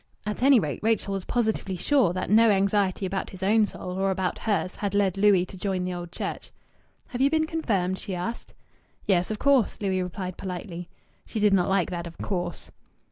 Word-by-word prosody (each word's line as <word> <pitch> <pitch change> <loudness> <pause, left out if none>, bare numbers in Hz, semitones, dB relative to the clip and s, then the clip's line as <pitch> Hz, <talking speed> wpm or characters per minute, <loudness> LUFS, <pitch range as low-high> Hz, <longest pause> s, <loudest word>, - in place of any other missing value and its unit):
At 210 +2 -3
any 270 -1 +6
rate, 150 -7 -3
Rachel 220 -2 +1
was 195 -2 -3
positively 220 -5 -1
sure 245 +1 +3
that 185 +1 -3
no 225 +1 +6
anxiety 200 -1 +2
about 190 +1 -3
his 190 -1 -9
own 210 +2 +4
soul 180 -1 -6
or 195 0 +2
about 190 -1 -1
hers 205 -4 -1
had 200 -1 -2
led 195 -3 +2
Louis 195 -2 +4
to 190 - -12
join 185 -1 -2
the 180 - -2
Old 175 -1 -6
Church. - - -5 0.6
"Have 250 -1 -4
you 275 - +5
been 315 +1 +2
confirmed?" 200 - -1
she 190 - -5
asked. 230 +7 -5 0.5
"Yes, 180 -3 +2
of 215 - -2
course," 275 -2 +2
Louis 190 -2 0
replied 180 0 -5
politely. 180 -2 -6 0.4
She 220 - -4
did 205 -1 +4
not 185 -2 +3
like 190 -2 +1
that 170 -1 -4
"of 165 - -11
course." 175 -3 -4
195 Hz, 200 wpm, -26 LUFS, 180-215 Hz, 0.6 s, any